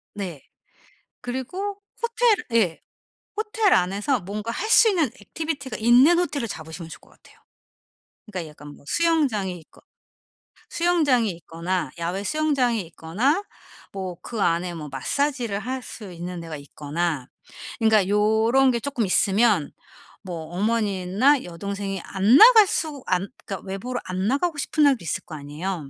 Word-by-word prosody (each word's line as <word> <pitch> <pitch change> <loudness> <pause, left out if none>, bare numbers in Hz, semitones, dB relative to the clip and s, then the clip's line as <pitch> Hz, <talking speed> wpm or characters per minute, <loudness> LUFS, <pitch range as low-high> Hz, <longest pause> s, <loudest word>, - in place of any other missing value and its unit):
네. 180 -8 -6 0.8
그리고 365 +12 -4 0.2
호텔 470 -1 +3 0.2
예. 200 -8 +2 0.6
호텔 430 -2 +2
안에서 200 +8 +1
뭔가 210 +5 -5
할 435 - -3
수 450 0 +7
있는 355 -6 +2
액티비티가 280 +4 -5
있는 250 +10 +5
호텔을 290 -8 -1
잡으시면 160 -2 -8
좋을 - - -10
것 - - -22
같아요. - - -22 0.9
그러니까 180 -7 -6
약간 150 -1 -13
뭐 - - -20
수영장이 265 - +1
있거 160 - -21 0.9
수영장이 305 -10 +2
있거나 170 +1 -4
야외 175 +4 -2
수영장이 260 -3 +1
있거나 220 - 0 0.5
뭐 190 -2 -5
그 230 -3 -5
안에 175 0 +1
뭐 150 -3 -7
마사지를 240 - -1
할 255 +4 -4
수 210 -6 -9
있는 175 +1 -6
데가 165 -2 -7
있거나 145 0 -3 0.5
그러니까 220 -4 +4
요런 220 +6 +3
게 235 - -1
쪼끔 255 -3 -2
있으면 200 -3 +2 0.5
뭐 170 -4 -6
어머니나 210 +5 +2
여동생이 195 +2 -5
안 200 +6 +4
나갈 445 -1 +9
수 300 -6 -2
안 185 +1 0 0.2
그러니까 195 -1 -6
외부로 240 +7 -4
안 185 +2 -2
나가고 290 +6 0
싶은 300 +1 +1
날도 275 -8 +3
있을 160 - -2
거 160 - -8
아니에요. 150 +2 -5
210 Hz, 310 characters per minute, -24 LUFS, 180-280 Hz, 0.9 s, 나갈